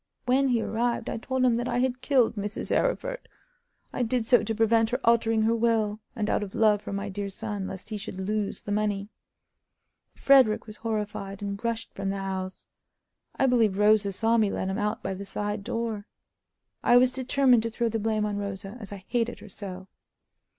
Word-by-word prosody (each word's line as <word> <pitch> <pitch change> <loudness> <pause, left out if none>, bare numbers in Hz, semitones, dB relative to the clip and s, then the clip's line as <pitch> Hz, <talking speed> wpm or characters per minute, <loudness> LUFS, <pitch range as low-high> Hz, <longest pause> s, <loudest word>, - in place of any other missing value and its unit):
When 265 +2 +3
he 240 -3 +1
arrived 235 +1 -1
I - - -3
told 260 +3 0
him 235 -2 +3
that 240 +1 -2
I - - -1
had 255 0 0
killed 255 -4 +3
Mrs. 205 +1 -3
Arryford. - - -1 0.7
I - - -2
did 240 -1 0
so 240 -1 +5
to 220 +1 -2
prevent 225 0 +3
her 250 +2 -1
altering 225 -1 +3
her 225 +1 +3
will, 220 -2 +1 0.2
and 215 -3 -1
out - - +1
of 200 -2 -6
love 210 -2 +4
for - - -7
my 200 +1 -3
dear 200 0 -4
son, 205 -1 -4
lest 190 +2 -8
he 215 -2 -4
should 200 -2 -7
lose 205 +1 -2
the 205 - -6
money. 205 -1 -1 1.1
Frederick 260 -6 +5
was 215 -1 -9
horrified, 210 -3 -4
and 200 +1 -4
rushed 230 -1 -2
from 195 - -3
the 195 - -2
house. 190 -1 -4 0.7
I - - +2
believe 230 -6 +3
Rosa 210 -1 +4
saw 225 +4 +2
me 215 -3 +3
let 190 - -2
him 195 +3 -2
out 210 0 -1
by 190 - -2
the 195 +1 -6
side 205 +1 -3
door. 225 -1 -3 0.8
I 240 - +6
was 250 +1 +5
determined 260 -1 +3
to 230 - -2
throw 235 +1 -1
the 225 0 -1
blame 215 0 0
on 205 -1 -2
Rosa, 200 +1 -5
as 205 -3 -8
I 195 -2 -9
hated 240 -1 -1
her - - -12
so. 185 -1 -8
220 Hz, 200 wpm, -27 LUFS, 200-235 Hz, 1.1 s, I